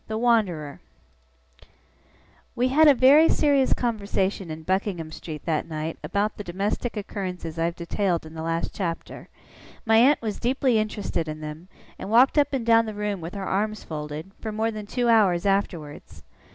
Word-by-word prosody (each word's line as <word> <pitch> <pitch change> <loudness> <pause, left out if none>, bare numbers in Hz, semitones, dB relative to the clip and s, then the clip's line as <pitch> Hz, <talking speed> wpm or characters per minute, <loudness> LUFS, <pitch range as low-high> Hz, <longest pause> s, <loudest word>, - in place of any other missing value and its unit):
THE 220 - -3
WANDERER 200 -11 0 1.7
We 250 +2 +1
had 310 +4 +5
a 290 - +7
very 280 +6 +6
serious 280 -3 +3
conversation 200 -5 -2
in 160 0 -7
Buckingham 185 -2 -2
Street 155 -2 -8
that 160 -2 -1
night, 160 0 -5
about 205 +1 -1
the 205 - -6
domestic 205 +6 -3
occurrences 180 -5 -5
I 165 - +2
have 170 0 -2
detailed 175 0 -1
in 155 - -11
the 160 - -6
last 165 +1 -2
chapter. 170 -4 -5 0.6
My 225 0 +4
aunt 270 +6 +5
was 215 -3 -4
deeply 250 -1 +1
interested 205 -6 -2
in 155 0 -5
them, 155 +3 -8 0.3
and - - -6
walked 250 +6 +5
up 285 -1 +2
and 265 -5 -2
down 230 -1 +4
the 215 - -5
room 205 -3 -3
with 165 +4 -7
her 195 -1 -4
arms 215 +3 -1
folded, 150 +3 -6
for 220 - -5
more 220 +1 -1
than 215 -2 -7
two 245 +2 -1
hours 200 -6 +3
afterwards. 170 - -2
200 Hz, 175 wpm, -25 LUFS, 165-225 Hz, 1.7 s, a